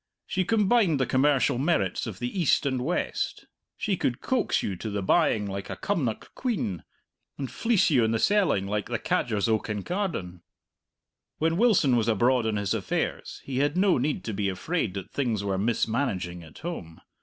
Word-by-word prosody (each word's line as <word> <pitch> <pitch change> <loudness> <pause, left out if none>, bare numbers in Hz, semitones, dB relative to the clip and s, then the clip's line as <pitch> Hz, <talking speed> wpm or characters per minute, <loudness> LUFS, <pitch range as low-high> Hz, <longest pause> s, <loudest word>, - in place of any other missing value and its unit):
She 185 -1 -1
combined 205 - +3
the 130 - +2
commercial 135 -1 +2
merits 125 - 0
of 105 -4 -6
the 125 - -3
East 150 - +3
and 130 -2 0
West. 170 +7 -2 0.3
She 205 -3 0
could 125 -8 -1
coax 255 -3 0
you 100 - -2
to 110 - -5
the 100 -1 -2
buying 105 +2 +3
like 100 0 -5
a - - -4
Cumnock 170 - -2
quean, 185 - -2 0.6
and 135 -3 -4
fleece 230 -7 +2
you 125 -5 +4
in 110 - +2
the 115 - +1
selling 185 - +2
like 105 0 -2
the - - 0
cadgers 105 -4 0
o' 110 -1 +3
Kincardine. 105 - -3 1.0
When 160 +1 +1
Wilson 180 - +4
was 115 -2 +1
abroad 120 +2 +3
on 110 - 0
his 100 -2 0
affairs - - -3
he 130 -1 -3
had 145 +4 +1
no 190 -6 +4
need 145 +4 -1
to 110 - -4
be 100 0 0
afraid 100 - -2
that 95 - -6
things 115 -7 -1
were 95 -2 -1
mismanaging 110 -5 -1
at 80 -3 -14
home. 85 - -7
125 Hz, 180 wpm, -27 LUFS, 100-170 Hz, 1.0 s, you